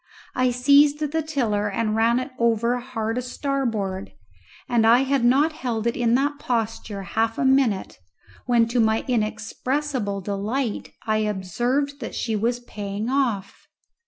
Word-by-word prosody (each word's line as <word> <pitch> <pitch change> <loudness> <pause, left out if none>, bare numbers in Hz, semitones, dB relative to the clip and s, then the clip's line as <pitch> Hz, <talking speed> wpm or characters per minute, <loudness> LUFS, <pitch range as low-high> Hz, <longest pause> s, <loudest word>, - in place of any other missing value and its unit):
I 255 0 +2
seized 285 +4 +5
the 305 +1 -1
tiller 230 -10 -1
and 215 +1 -1
ran 230 +2 +3
it 255 +2 -3
over 235 +1 +2
hard 225 -1 -3
a - - -2
starboard, 235 -8 -2 0.6
and 235 -3 +3
I 235 +3 +6
had 270 -2 +1
not 280 +6 +4
held 240 -7 -3
it 235 - +1
in 240 -1 +2
that 285 +2 0
posture 225 -5 -2
half 225 +4 -1
a - - 0
minute 265 -7 +2 0.5
when 235 -2 +4
to 240 +1 0
my 220 0 +2
inexpressible 240 0 -2
delight 210 +5 -3
I 215 -1 +1
observed 240 - -1
that 230 - -6
she 225 -2 -1
was 235 +3 0
paying 210 0 -5
off. 240 -8 -1
235 Hz, 150 wpm, -23 LUFS, 215-265 Hz, 0.6 s, I